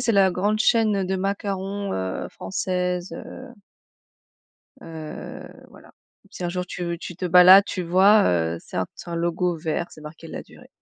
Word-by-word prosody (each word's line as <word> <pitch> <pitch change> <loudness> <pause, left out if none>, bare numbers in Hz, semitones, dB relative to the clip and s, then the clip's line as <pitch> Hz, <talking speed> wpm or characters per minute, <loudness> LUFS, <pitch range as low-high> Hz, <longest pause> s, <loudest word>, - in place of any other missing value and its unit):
c'est - - +3
la 195 -3 +4
grande 205 +4 0
chaîne, 220 -2 +3
heu, 195 - 0
de 190 +1 -2
macarons, 195 0 -3
heu, 95 0 -3
française, 180 - -3
heu. 255 +1 -9 1.3
Heu, 160 -2 -8 0.2
voilà. - - -17 0.4
Si 180 - -7
un 175 - 0
jour 180 +1 -3
tu 180 0 -5
veux, 170 -1 -3
tu 175 - -8
te 185 - -5
balades, 180 +2 +8
tu 185 -2 -4
vois, 190 +5 +5
heu, 85 -1 0
c'est - - -10
un 95 - 0
c'est 175 - -10
un 170 - -3
logo 170 +1 0
vert, 160 +1 -2
c'est - - -14
marqué 155 +2 -11
Ladurée. - - -11
180 Hz, 180 wpm, -23 LUFS, 165-195 Hz, 1.3 s, balades